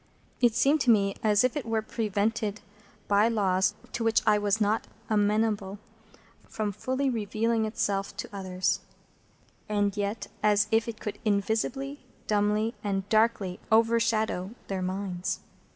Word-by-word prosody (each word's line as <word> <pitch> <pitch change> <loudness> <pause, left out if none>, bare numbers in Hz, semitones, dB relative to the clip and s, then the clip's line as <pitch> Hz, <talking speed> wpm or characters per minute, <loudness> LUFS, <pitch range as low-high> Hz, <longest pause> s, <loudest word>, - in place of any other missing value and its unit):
It 240 -3 +4
seemed 275 +5 +3
to 255 - +2
me 200 -3 +4
as 210 0 +3
if 255 - +1
it 295 - -2
were 225 -1 -1
prevented, 215 0 -1 0.5
by 205 +2 +4
laws 195 -4 +2 0.2
to 235 - -3
which 225 0 +3
I 210 -1 +4
was 205 +1 +1
not 215 +1 +1 0.2
amenable, 210 -1 +1 0.7
from 215 -2 -2
fully 260 +7 -2
revealing 225 -1 0
itself 200 -2 -2
to - - -5
others, 185 -1 -1 0.9
and 205 -1 +1
yet 205 +1 -2 0.2
as 210 0 +4
if 225 +1 +3
it 225 -1 -5
could 210 - -5
invisibly, 220 +7 -1 0.3
dumbly, 210 +2 +1
and 195 -1 -1
darkly 215 -4 +2
overshadow 225 -3 +2
their 195 -1 -2
minds. 185 -1 -3
215 Hz, 135 wpm, -28 LUFS, 200-225 Hz, 0.9 s, It